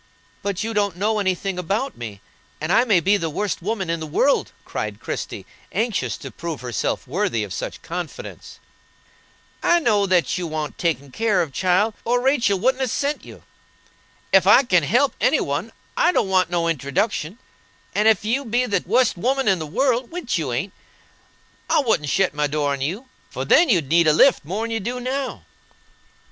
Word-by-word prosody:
"But 200 0 -2
you 225 +1 -3
don't 205 -3 0
know 215 +3 +1
any 190 -2 +1
thing 190 0 -4
about 210 +10 -2
me, 105 -4 -8 0.4
and 155 +4 -1
I 235 - +5
may 205 -7 +4
be 200 +5 +3
the 165 -4 -2
worst 200 +4 -2
woman 200 0 -2
in 165 0 -1
the 160 - -5
world," 265 - +1
cried - - -4
Christie, - - -5 0.3
anxious 200 - -1
to - - -9
prove 165 -4 -6
herself 125 +2 -2
worthy 170 - 0
of 100 - -6
such - - -6
confidence. 175 -1 -7 1.0
"I 345 - +4
know 210 -9 +2
that 180 -1 +2
you 175 - -3
want 155 -1 -4
takin' 145 -5 -1
care 210 - +1
of, 145 -5 -8
child, 185 - +2
or 245 +1 +1
Rachel 245 -6 +2
wouldn't 260 +5 +1
a 260 - +1
sent 285 +5 -2
you. - - -13 0.9
Ef 190 -1 +6
I 230 +7 +7
can 180 -8 +3
help 245 - +2
any - - +3
one, - - -2 0.2
I 350 - +3
don't 200 - +1
want 185 -1 +2
no 170 -1 0
introduction; 160 - -1 0.6
and 210 +2 +2
ef 215 -2 +3
you 250 +6 0
be 245 +1 0
the 205 - 0
wust 240 0 +2
woman 265 +6 0
in 190 -3 +3
the 155 - -5
world 245 - 0
(which 335 -8 -3
you 145 -6 -2
ain't), 160 +11 -3 1.0
I - - +4
wouldn't 220 - 0
shet 190 0 +2
my 150 0 0
door 145 0 -1
on 140 -1 -3
you, 190 - -3 0.2
for - - -4
then 345 - +5
you'd 170 - +2
need 170 0 +4
a 155 - +5
lift 260 - +5
more'n 215 +8 -3
you 225 - -1
do 240 +5 -4
now." 260 +2 -3
195 Hz, 190 wpm, -22 LUFS, 165-235 Hz, 1.0 s, I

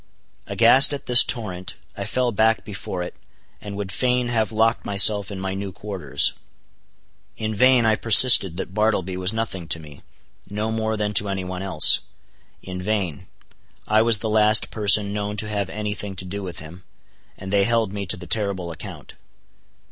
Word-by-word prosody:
Aghast 130 +5 +4
at 140 - -10
this 125 0 +7
torrent, 95 -7 -6 0.2
I 100 - -6
fell 125 +3 -1
back 110 +1 +1
before 95 -3 -6
it, 90 - -9 0.5
and 100 -1 -8
would 100 -2 -5
fain 125 +1 -1
have 110 -4 -1
locked 115 +1 0
myself 100 0 +4
in 100 -2 -7
my 95 0 -4
new 100 0 -6
quarters. 95 -8 -1 1.0
In 110 0 -4
vain 125 +2 +3
I 110 -1 +3
persisted 110 -6 +6
that 95 - -6
Bartleby 105 -3 -1
was 95 +1 -1
nothing 110 -6 -5
to 80 - -2
me—no 100 +8 -9
more 110 0 -2
than 105 0 -2
to 105 0 +1
any 95 -1 -3
one 90 0 -6
else. 95 -5 +3 0.6
In 90 -1 -7
vain:—I 105 +2 -4
was 115 -1 +2
the 110 - -5
last 110 0 +4
person 105 -1 +2
known 105 0 -4
to 105 - -2
have 100 -3 -3
any 105 +1 -4
thing 100 -1 -6
to 95 - -7
do 100 +3 -6
with 90 -4 -6
him, 85 +4 -12 0.5
and 95 +1 -7
they 100 -1 +3
held 115 -3 0
me 100 -1 -5
to - - +1
the 90 - -11
terrible 95 -2 -3
account. 80 - -10
105 Hz, 175 wpm, -21 LUFS, 95-110 Hz, 1.0 s, this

